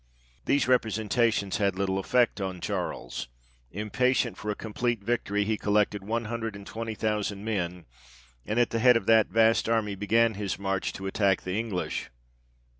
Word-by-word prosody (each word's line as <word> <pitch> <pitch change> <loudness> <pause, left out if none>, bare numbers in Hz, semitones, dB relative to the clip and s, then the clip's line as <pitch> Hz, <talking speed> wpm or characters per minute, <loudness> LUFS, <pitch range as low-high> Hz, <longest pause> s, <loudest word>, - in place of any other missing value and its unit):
These 140 - +2
representations 110 -3 +1
had 100 -3 +1
little 95 0 0
effect 120 +1 +2
on 95 -2 -3
Charles; - - -4 0.4
impatient 115 - 0
for 105 - -6
a 105 - 0
complete 115 0 -2
victory, 105 -2 0
he 110 0 -1
collected 105 -1 +1
one 115 +3 -2
hundred 115 -1 -4
and 100 0 -10
twenty 115 +1 -5
thousand 105 -1 -2
men, 90 -5 -2 0.6
and 110 - -1
at 120 - +2
the 115 - 0
head 125 0 +6
of 100 - -4
that 110 -1 +5
vast 115 0 +3
army 110 -3 +1
began 110 +3 +2
his 100 -1 -3
march 95 -1 -1
to 95 - -7
attack 95 0 +1
the 90 - -3
English. 105 -3 -3
105 Hz, 165 wpm, -27 LUFS, 100-115 Hz, 0.6 s, head